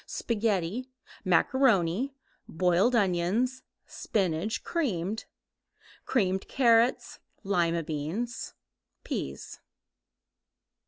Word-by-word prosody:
Spaghetti, 220 Hz, +1 st, -1 dB, 0.3 s
macaroni, 210 Hz, +3 st, +2 dB, 0.3 s
boiled 180 Hz, +8 st, +2 dB
onions, 205 Hz, +6 st, +1 dB, 0.2 s
spinach, 195 Hz, +2 st, -2 dB
creamed, 220 Hz, -, -2 dB, 0.8 s
creamed 190 Hz, -6 st, +1 dB
carrots, 235 Hz, -1 st, +3 dB, 0.2 s
lima 170 Hz, -4 st, +1 dB
beans, 165 Hz, +10 st, -4 dB, 0.5 s
peas. -, -, -5 dB
200 Hz, 60 wpm, -28 LUFS, 175-240 Hz, 0.8 s, carrots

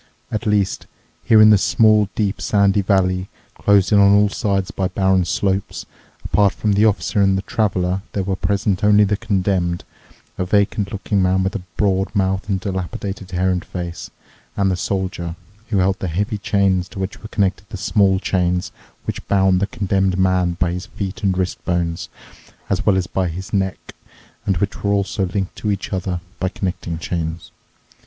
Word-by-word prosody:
At 110 Hz, +2 st, -3 dB
least, 100 Hz, -2 st, 0 dB, 0.4 s
here 110 Hz, -, +5 dB
in 110 Hz, -, +8 dB
the 105 Hz, -, +6 dB
small, 105 Hz, -1 st, +4 dB
deep, 105 Hz, -2 st, -1 dB
sandy 100 Hz, -1 st, +3 dB
valley, 95 Hz, -1 st, +1 dB, 0.3 s
closed 100 Hz, -2 st, +3 dB
in 105 Hz, -, +6 dB
on 100 Hz, 0 st, +6 dB
all 105 Hz, 0 st, +4 dB
sides 100 Hz, -2 st, -1 dB
by 95 Hz, -, -1 dB
barren 95 Hz, -1 st, +2 dB
slopes, 95 Hz, +3 st, -1 dB, 0.4 s
apart 100 Hz, -2 st, +3 dB
from 105 Hz, -2 st, 0 dB
the 105 Hz, +2 st, +4 dB
Officer 105 Hz, 0 st, +1 dB
and 95 Hz, -1 st, +3 dB
the 95 Hz, -, -3 dB
Traveler 95 Hz, -4 st, 0 dB
there 100 Hz, -, -1 dB
were 95 Hz, 0 st, -1 dB
present 100 Hz, 0 st, 0 dB
only 105 Hz, 0 st, +6 dB
the 105 Hz, 0 st, +2 dB
Condemned, 95 Hz, -5 st, -1 dB, 0.6 s
a -, -, +1 dB
vacant 100 Hz, +1 st, +1 dB
looking 100 Hz, -1 st, -1 dB
man 95 Hz, 0 st, +2 dB
with 95 Hz, -, -2 dB
a 100 Hz, -, -3 dB, 0.2 s
broad 95 Hz, 0 st, +1 dB
mouth 95 Hz, +1 st, 0 dB
and 95 Hz, -1 st, +1 dB
dilapidated 95 Hz, +1 st, -4 dB
hair 95 Hz, +1 st, +1 dB
and 90 Hz, -1 st, -1 dB
face, 85 Hz, -2 st, -6 dB, 0.5 s
and 100 Hz, -1 st, +2 dB
the -, -, +1 dB
Soldier, 90 Hz, -2 st, -3 dB, 0.3 s
who 105 Hz, -, -1 dB
held 95 Hz, +1 st, +2 dB
the 95 Hz, -, -3 dB
heavy 100 Hz, +5 st, -2 dB
chain 100 Hz, -2 st, +2 dB
to -, -, -12 dB
which 95 Hz, +1 st, -4 dB
were 110 Hz, -, -8 dB
connected 100 Hz, -1 st, -1 dB
the -, -, -6 dB
small 95 Hz, 0 st, +2 dB
chains 90 Hz, -2 st, 0 dB, 0.3 s
which -, -, -5 dB
bound 95 Hz, -2 st, +3 dB
the 100 Hz, -, 0 dB
Condemned 95 Hz, -5 st, 0 dB
Man 95 Hz, -2 st, +2 dB
by 85 Hz, 0 st, +1 dB
his 90 Hz, +1 st, -5 dB
feet 100 Hz, +3 st, -5 dB
and 95 Hz, -3 st, +1 dB
wrist 90 Hz, -1 st, -2 dB
bones, 85 Hz, -2 st, -2 dB, 0.6 s
as 100 Hz, +3 st, +1 dB
well 100 Hz, -2 st, +5 dB
as 95 Hz, -, 0 dB
by 95 Hz, 0 st, -1 dB
his 90 Hz, +3 st, -6 dB
neck, 95 Hz, -2 st, -2 dB, 0.5 s
and 95 Hz, -, +2 dB
which 100 Hz, +1 st, -2 dB
were 100 Hz, 0 st, +2 dB
also 100 Hz, 0 st, 0 dB
linked 95 Hz, +1 st, -3 dB
to 105 Hz, -, -2 dB
each 100 Hz, 0 st, -3 dB
other 90 Hz, -2 st, -2 dB, 0.2 s
by 95 Hz, -, 0 dB
connecting 90 Hz, -3 st, -4 dB
chains. 85 Hz, -1 st, -4 dB
95 Hz, 185 wpm, -20 LUFS, 95-100 Hz, 0.6 s, in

